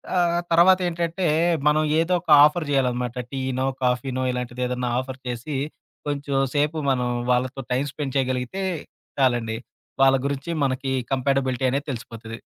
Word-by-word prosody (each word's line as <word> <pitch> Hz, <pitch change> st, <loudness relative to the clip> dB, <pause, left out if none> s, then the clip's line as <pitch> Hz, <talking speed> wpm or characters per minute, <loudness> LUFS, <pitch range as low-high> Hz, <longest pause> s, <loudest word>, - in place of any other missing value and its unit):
ఆహ్, 175 Hz, -1 st, +2 dB
తర్వాతేంటంటే 175 Hz, 0 st, +3 dB, 0.4 s
మనం 155 Hz, +1 st, +4 dB, 0.2 s
ఏదో 165 Hz, +2 st, +1 dB
ఒక 170 Hz, -, -15 dB, 0.2 s
ఆఫర్ 155 Hz, +1 st, 0 dB
చేయాలనమాట. 125 Hz, -3 st, 0 dB, 0.2 s
టీనో, 130 Hz, -1 st, -2 dB, 0.2 s
కాఫీనో 125 Hz, +1 st, 0 dB
ఇలాంటిదేదన్నా 125 Hz, 0 st, -3 dB
ఆఫర్ 130 Hz, 0 st, -6 dB
చేసి 125 Hz, +4 st, -4 dB, 0.5 s
కొంచెం 140 Hz, -1 st, -2 dB, 0.2 s
సేపు 150 Hz, +2 st, +1 dB
మనం 125 Hz, -2 st, +1 dB, 0.2 s
వాళ్ళతో 130 Hz, +2 st, 0 dB
టైమ్ 135 Hz, +3 st, +1 dB
స్పెండ్ 140 Hz, -2 st, -5 dB
చేయగలిగితే 130 Hz, +7 st, -1 dB, 0.6 s
చాలండి. 120 Hz, -4 st, +1 dB, 0.4 s
వాళ్ళ 135 Hz, 0 st, +6 dB
గురించి 140 Hz, +3 st, -2 dB
మనకి 135 Hz, 0 st, -1 dB, 0.2 s
కంపేాటబిలిటీ 130 Hz, -1 st, 0 dB
అనేది 140 Hz, +3 st, -2 dB
తెలిసిపోతది. 115 Hz, -2 st, -7 dB
135 Hz, 125 wpm, -24 LUFS, 125-150 Hz, 0.6 s, వాళ్ళ